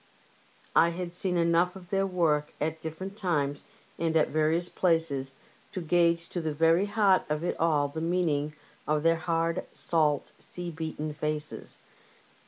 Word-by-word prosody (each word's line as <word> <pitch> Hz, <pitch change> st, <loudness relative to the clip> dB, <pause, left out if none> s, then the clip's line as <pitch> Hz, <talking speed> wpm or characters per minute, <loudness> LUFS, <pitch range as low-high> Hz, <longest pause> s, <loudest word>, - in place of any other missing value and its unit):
I 170 Hz, -, +6 dB
had 175 Hz, +1 st, -4 dB
seen 180 Hz, 0 st, -1 dB
enough 170 Hz, +2 st, +3 dB
of 180 Hz, -2 st, -12 dB
their 195 Hz, 0 st, +2 dB
work 160 Hz, -5 st, +1 dB
at 160 Hz, +1 st, -2 dB
different 185 Hz, +5 st, -6 dB
times 145 Hz, -8 st, -1 dB, 0.4 s
and 165 Hz, -1 st, +2 dB
at 155 Hz, -, +3 dB
various 155 Hz, +3 st, +1 dB
places 160 Hz, -8 st, +1 dB, 0.4 s
to -, -, -3 dB
gauge 170 Hz, 0 st, +2 dB
to 175 Hz, -, -3 dB
the 155 Hz, -2 st, -2 dB
very 165 Hz, +5 st, +4 dB
heart 205 Hz, -3 st, +4 dB
of 150 Hz, +1 st, -1 dB
it 175 Hz, -, -1 dB
all 150 Hz, -3 st, +3 dB
the 160 Hz, +3 st, -5 dB
meaning 160 Hz, -4 st, 0 dB, 0.3 s
of 150 Hz, 0 st, +1 dB
their 165 Hz, 0 st, +5 dB
hard, 165 Hz, 0 st, 0 dB
salt, 150 Hz, -4 st, +1 dB
sea 175 Hz, -1 st, -4 dB
beaten 160 Hz, -1 st, -4 dB
faces. 150 Hz, 0 st, -3 dB
165 Hz, 155 wpm, -29 LUFS, 155-175 Hz, 0.4 s, I